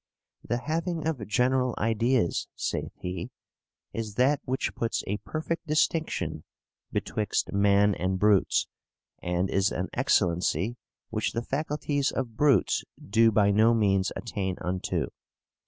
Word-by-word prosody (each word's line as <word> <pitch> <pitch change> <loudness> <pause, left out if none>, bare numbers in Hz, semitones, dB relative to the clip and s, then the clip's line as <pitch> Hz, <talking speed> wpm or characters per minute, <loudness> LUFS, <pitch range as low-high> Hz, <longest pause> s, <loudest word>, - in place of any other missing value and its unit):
'The 120 - -1
having 165 +2 -2
of 130 - -2
general 125 +3 +2
ideas,' 115 -2 +1
saith - - -3
he, 90 -1 -4 0.6
'is 110 -3 -4
that 135 +4 +3
which 130 +1 -1
puts 115 -1 -2
a 100 - -1
perfect 160 +6 -4
distinction 150 - 0 0.5
betwixt 105 0 -1
man 100 0 +4
and 95 0 -1
brutes, 105 0 +3 0.6
and 90 +1 0
is 95 0 +2
an - - -2
excellency 90 +5 +1 0.4
which 110 -1 -1
the 115 - -2
faculties 145 0 -1
of 120 -4 -3
brutes 140 +1 +3 0.2
do 115 +3 +3
by 100 -1 +4
no 110 +3 +5
means 95 -3 +2
attain 95 -5 -3
unto. 90 -3 -1
110 Hz, 125 wpm, -27 LUFS, 95-130 Hz, 0.6 s, no